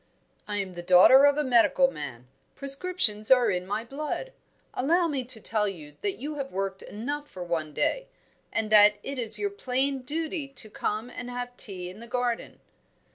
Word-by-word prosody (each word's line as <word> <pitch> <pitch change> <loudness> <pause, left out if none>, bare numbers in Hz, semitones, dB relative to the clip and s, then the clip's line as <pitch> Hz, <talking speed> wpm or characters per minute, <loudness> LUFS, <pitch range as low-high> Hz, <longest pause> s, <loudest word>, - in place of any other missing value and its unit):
"I 205 -1 -3
am 190 -2 -3
the 175 - -7
daughter 185 +10 +7
of 285 0 +4
a 300 - +1
medical 260 +1 +4
man. 125 - -8 0.3
Prescriptions 275 - +1
are 250 -4 +5
in 180 0 -3
my 210 +3 -2
blood. 300 - -5 0.4
Allow 335 +7 +2
me 280 -5 -2
to 240 -2 -3
tell 215 -1 -1
you 155 -7 -8
that 400 -2 -2
you 295 +3 -6
have 275 -1 -5
worked 195 0 -3
enough 290 +8 -5
for 180 - -7
one 165 -3 -3
day, - - -1 0.4
and 215 -1 -1
that 210 0 +7
it 275 -1 -5
is 230 -3 +5
your 405 -1 -2
plain 270 -7 -1
duty 310 +3 -3
to 245 -6 -4
come 215 +5 -3
and 245 0 -7
have 245 0 -5
tea 185 -6 -5
in 185 +4 -10
the 235 - -10
garden." 245 -1 -3
245 Hz, 185 wpm, -27 LUFS, 205-280 Hz, 0.4 s, daughter